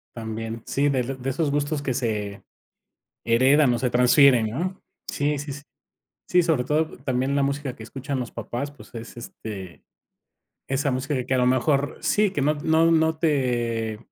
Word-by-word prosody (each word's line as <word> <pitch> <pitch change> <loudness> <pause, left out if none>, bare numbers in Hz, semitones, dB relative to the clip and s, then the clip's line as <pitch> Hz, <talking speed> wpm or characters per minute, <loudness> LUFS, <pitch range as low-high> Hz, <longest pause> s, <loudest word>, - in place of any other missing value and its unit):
También, 115 0 -5
sí, 145 +1 +1
del 130 -1 -2
de 135 - -2
esos 145 +2 0
gustos 145 0 -1
que 130 -3 -1
se 105 -6 -3 0.8
heredan 130 +3 +4
o 120 - -1
se 125 - 0
transfieren, 125 -1 +5
¿no?, 180 - -4 0.3
sí, 145 +1 0
sí, 145 0 -5
sí. 140 - -9 0.7
Sí, 180 -1 +4
sobre 160 -7 +1
todo 155 +4 0
también 130 +1 0
la 140 - +2
música 140 -1 -2
que 110 - -10
escuchan 135 +4 -5
los 125 -2 -4
papás, 140 +4 -5
pues 145 - -16
es, 115 +1 -8
este, 100 -6 -8 0.8
esa 135 +1 0
música 130 0 -2
que 130 - -3
a 130 - +3
lo 125 - +3
mejor, 140 +2 +1
sí 210 -2 +2
que 145 - -1
no 150 +2 +2
no 160 +2 +3
no 160 -1 +3
te 120 -8 0
135 Hz, 175 wpm, -24 LUFS, 120-145 Hz, 0.8 s, transfieren